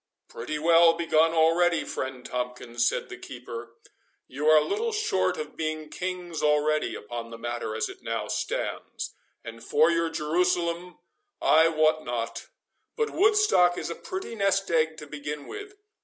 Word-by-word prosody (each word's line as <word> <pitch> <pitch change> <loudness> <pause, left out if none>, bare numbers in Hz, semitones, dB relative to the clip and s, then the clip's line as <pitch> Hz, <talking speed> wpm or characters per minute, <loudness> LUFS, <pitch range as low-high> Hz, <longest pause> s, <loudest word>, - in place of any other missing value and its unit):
"Pretty 150 +6 -5
well 165 +1 +6
begun 165 -1 +3
already, 165 +1 +3
friend 130 -1 -5
Tomkins," 125 -1 -2
said - - -1
the - - -8
keeper; 120 -2 -8 0.5
"you 145 +4 -3
are 155 0 +8
little 440 - -1
short 430 +1 0
of 460 - -6
being 155 -1 -3
kings 180 -2 -4
already 150 +1 +2
upon 115 +2 -6
the 115 - -8
matter 120 -2 -4
as 110 - -1
it - - -11
now - - -3
stands; - - -3 0.3
and 115 0 -9
for 160 +7 +4
your 165 0 +1
Jerusalem 170 +2 0 0.4
I 160 +1 +5
wot 155 -1 +2
not, 120 -1 -4 0.5
but 450 -2 0
Woodstock 400 - +4
is - - -4
a - - -4
pretty 375 -9 -6
nest 195 -3 +1
egg 160 -1 +2
to 150 - -8
begin 150 0 -6
with. 410 0 -8
160 Hz, 155 wpm, -27 LUFS, 130-175 Hz, 0.5 s, are